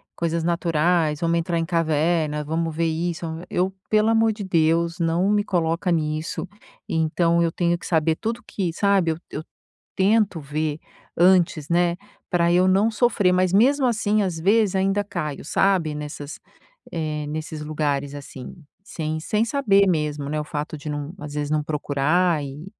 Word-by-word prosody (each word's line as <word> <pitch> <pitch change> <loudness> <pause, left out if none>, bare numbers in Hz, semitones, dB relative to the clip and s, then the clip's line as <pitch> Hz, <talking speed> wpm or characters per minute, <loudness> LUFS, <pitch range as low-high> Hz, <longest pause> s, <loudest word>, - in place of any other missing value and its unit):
coisas 170 -1 -1
naturais, 170 -2 +1
vamos 170 0 +2
entrar 170 0 -1
em 165 - -1
caverna, 160 -2 0
vamos 160 +1 -2
ver 165 +1 +1
isso." 170 +1 -2 0.2
Eu 185 +2 0 0.2
pelo 215 +1 +3
amor 225 -1 +3
de 210 - -7
Deus, 170 -1 +1
não 170 +3 +1
me 205 -1 +2
coloca 170 0 0
nisso. 155 -1 -2 0.4
Então 165 +1 +1
eu 165 -1 +1
tenho 175 -1 +1
que - - -12
saber 160 -1 +1
tudo 230 +2 -4
que 180 -5 -3
sabe, 195 -4 +2
eu 160 - -3
eu 150 - -4 0.3
eu - - -74
tento 200 -2 +2
ver 150 +1 -3 0.4
antes, 175 -4 +3
né, 175 0 +2 0.3
pra 170 -2 +2
eu 180 +1 +4
não 195 +4 +3
sofrer, 220 -4 +2
mas 185 0 +2
mesmo 260 +7 +4
assim, 215 -3 +1
às 175 -4 -3
vezes 205 +3 +3
ainda 195 +2 +1
caio, 155 -9 -5
sabe 180 -2 +1
nessas 150 0 -7 0.5
eh, 155 -3 -3
nesses 155 0 -5
lugares 145 -2 -2
assim, 135 -2 -9 0.3
sem 155 -5 -4
sem 210 +7 0
saber 205 -7 +3
mesmo, 150 -4 -1
né, 155 +1 -1
o - - -5
fato 150 +1 -5
de 150 - -7
não 145 +2 -4
às 150 -2 -7
vezes 145 0 -2
não 155 -1 +1
procurar 150 +3 +1
e 140 +3 -8
170 Hz, 170 wpm, -23 LUFS, 155-190 Hz, 0.5 s, eu